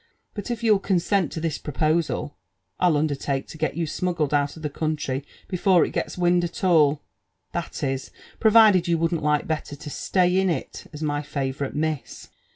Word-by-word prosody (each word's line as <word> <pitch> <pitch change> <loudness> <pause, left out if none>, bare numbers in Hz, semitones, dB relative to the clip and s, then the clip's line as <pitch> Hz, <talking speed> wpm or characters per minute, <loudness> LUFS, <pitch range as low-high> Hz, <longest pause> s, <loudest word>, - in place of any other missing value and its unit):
But 205 +2 -6
if 235 -1 -3
you'll 215 -3 +4
cohsent 190 -2 +1
to - - -5
this 160 -2 -2
proposal, 155 +1 -1 0.4
I'll 175 -4 +3
undertake 140 -2 -1
to - - -9
getyou 160 +1 -1
smuggled 160 -2 -1
out 145 -1 +1
of 160 - -11
the 150 - -1
country 150 -3 -2 0.2
before 180 -1 +3
it - - -5
gets - - -3
wind 175 0 +3
at 170 +3 -5
all, 155 -5 +4 0.2
— 90 +3 -49
^^that 170 -4 -3
is, 135 0 -3 0.3
provided 215 -5 +6
you 170 -1 +2
wouldn't 165 0 0
like 150 0 +1
better 155 -2 -3
to 145 - -9
stay 180 +3 +1
in 190 -1 +2
it 170 - -4
as 150 0 -7
my 145 -1 0
favourite 140 -1 -3
miss." 155 -1 -3
160 Hz, 180 wpm, -24 LUFS, 145-180 Hz, 0.4 s, provided